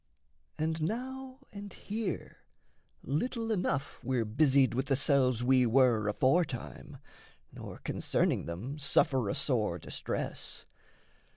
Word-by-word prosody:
And 160 +1 -1
now 260 - -4
and 200 -1 -8
here, 210 -3 -4 0.7
Little 225 - -1
enough 160 -9 -1
we're 125 -3 0
busied 135 +3 +3
with 130 +3 -1
the 135 - +3
selves 130 -4 +3
We 130 -1 +4
were 115 -3 +4
aforetime, 130 +5 0 0.5
nor, - - -9
concerning - - 0
them, 115 - -5
Suffer 135 - +2
a - - -1
sore 110 - +1
distress. - - -5
140 Hz, 110 wpm, -31 LUFS, 125-180 Hz, 0.7 s, We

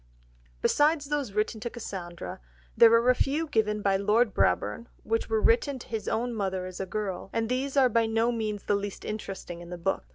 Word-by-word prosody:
Besides 295 -1 +3
those 285 -8 -2
written 215 +2 -1
to 235 - -4
Cassandra, 185 -7 -7 0.4
there 230 -1 +8
are 230 +2 +5
a - - +4
few 285 +5 0
given 210 -7 0
by 195 -1 +3
Lord 210 +2 +2
Brabourne, 235 - +1 0.2
which 225 +1 -1
were 220 -1 +2
written 255 +6 +2
to 245 - -11
his 225 -2 -4
own 240 +2 -1
mother 190 -4 -2
as 185 -1 -8
a 190 - -3
girl, 195 -1 -4
and 225 0 -1
these 265 +2 -1
are 265 -2 +6
by 230 -1 +2
no 225 +2 +2
means 215 -3 -3
the - - 0
least 200 0 -3
interesting 195 -5 -6
in 170 - -10
the 180 - -6
book. 185 +3 -1
220 Hz, 205 wpm, -28 LUFS, 200-240 Hz, 0.4 s, there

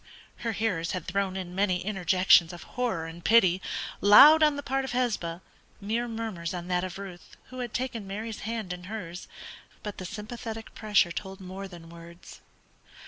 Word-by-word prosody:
Her 230 -1 -3
hearers 190 -7 -1
had 185 - -4
thrown 195 0 -1
in 180 -2 -6
many 185 -2 0
interjections 185 -3 +4
of 175 - -9
horror 230 -10 -2
and 165 +1 -9
pity, 190 -5 +5 0.4
loud 285 +10 +9
on 300 -1 +5
the 285 - -5
part 270 0 -1
of 265 - -5
Hesba, 210 -9 -1 0.4
mere 225 +4 -1
murmurs 220 -7 -4
on 175 0 -6
that 180 0 +1
of 185 -1 -5
Ruth, 190 -3 -10
who 255 - -8
had 245 -1 -4
taken 240 -5 -3
Mary's 215 +3 -5
hand 220 -4 -4
in 180 0 -9
hers, 180 -4 -7 0.6
but 210 -3 -6
the 185 - -6
sympathetic 225 +2 -7
pressure 205 -5 +2
told 190 +2 -6
more 190 +1 -7
than 170 -3 -12
words. 170 +1 -13
195 Hz, 175 wpm, -28 LUFS, 180-225 Hz, 0.6 s, loud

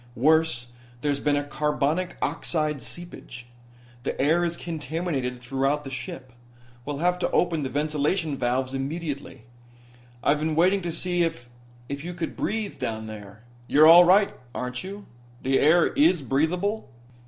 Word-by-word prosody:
Worse, 155 -1 +3 0.4
there's 145 -1 0
been 145 0 +1
a 145 - 0
carbonic 150 +4 -1
oxide 155 -4 -1
seepage. 150 -5 -7 0.6
The - - -4
air 160 +5 +3
is 170 0 -1
contaminated 155 -5 -3
throughout 135 +4 -1
the 135 - -7
ship. 130 -2 -7 0.5
We'll 145 -1 -3
have 180 +3 +1
to - - 0
open 170 -3 +1
the 135 - -2
ventilation 150 +2 0
valves 130 +1 -1
immediately. 140 -2 -4 0.8
I've 145 +1 +3
been 155 0 -1
waiting 185 +4 +3
to 170 -1 -3
see 175 +1 0
if 120 -8 -2 0.4
if 140 +1 -5
you 175 +1 -6
could 170 -1 -4
breathe 215 -7 -3
down 110 -3 -3
there. 105 0 -10 0.2
You're 150 +2 +6
all 170 +2 +10
right, 195 +3 +4 0.2
aren't 125 0 -4
you? 200 +2 -8 0.4
The 135 +1 +2
air 165 +4 +4
is 185 - +3
breathable?" 175 - 0
150 Hz, 150 wpm, -25 LUFS, 135-175 Hz, 0.8 s, all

